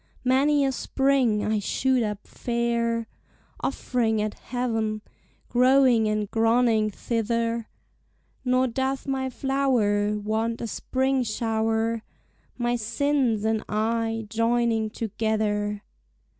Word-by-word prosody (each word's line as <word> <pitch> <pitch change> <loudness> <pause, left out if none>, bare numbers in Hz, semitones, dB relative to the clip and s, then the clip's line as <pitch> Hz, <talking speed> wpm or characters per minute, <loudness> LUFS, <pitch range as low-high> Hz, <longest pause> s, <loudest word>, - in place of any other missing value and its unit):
Many 275 +3 +3
a 270 - +1
spring 265 -5 +1
I 215 0 +1
shoot 255 +5 +1
up 210 -2 -3
fair, 235 -1 -1 0.6
Off'ring 235 -5 0
at 210 0 -1
heav'n, 225 -4 -2 0.4
growing 250 -2 +4
and 215 -1 -1
groning 225 -1 +3
thither; 230 +1 -2 0.7
Nor 255 0 +2
doth 265 +2 -2
my 265 -1 -1
flower 235 -7 +1
Want 220 +2 -1
a - - -3
spring 265 +4 0
showre, 225 0 0 0.6
My 240 0 0
sinnes 235 -1 0
and 220 -1 +1
I 225 +1 -1
joining 230 0 +1
together. 210 -1 -1
230 Hz, 105 wpm, -25 LUFS, 220-255 Hz, 0.7 s, growing